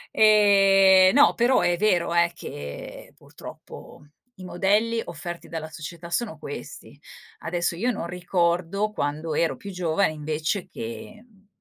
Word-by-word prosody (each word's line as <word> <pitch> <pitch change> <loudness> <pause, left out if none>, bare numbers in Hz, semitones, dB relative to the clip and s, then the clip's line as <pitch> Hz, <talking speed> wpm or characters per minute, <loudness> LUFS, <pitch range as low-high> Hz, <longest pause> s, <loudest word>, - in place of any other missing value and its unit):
Ehm, 195 -3 +6
no, 285 - +6
però 245 +2 +2
è 175 - +2
vero 180 -3 +1
eh, 170 0 +3
che 70 - -9
purtroppo 145 - -13 0.3
i 185 - -12
modelli 210 +6 0
offerti 175 +1 -8
dalla 160 -1 -6
società 170 +3 -9
sono 210 -6 -2
questi. 145 -2 -9 0.4
Adesso 170 0 -2
io 225 +9 -1
non 205 -8 -3
ricordo 180 +3 -1
quando 155 -1 -3
ero 165 +2 0
più 200 - -9
giovane 180 0 0
invece 155 +5 -3
che, 225 -2 -8
mhmm, 200 -3 -27
180 Hz, 135 wpm, -24 LUFS, 165-205 Hz, 0.4 s, Ehm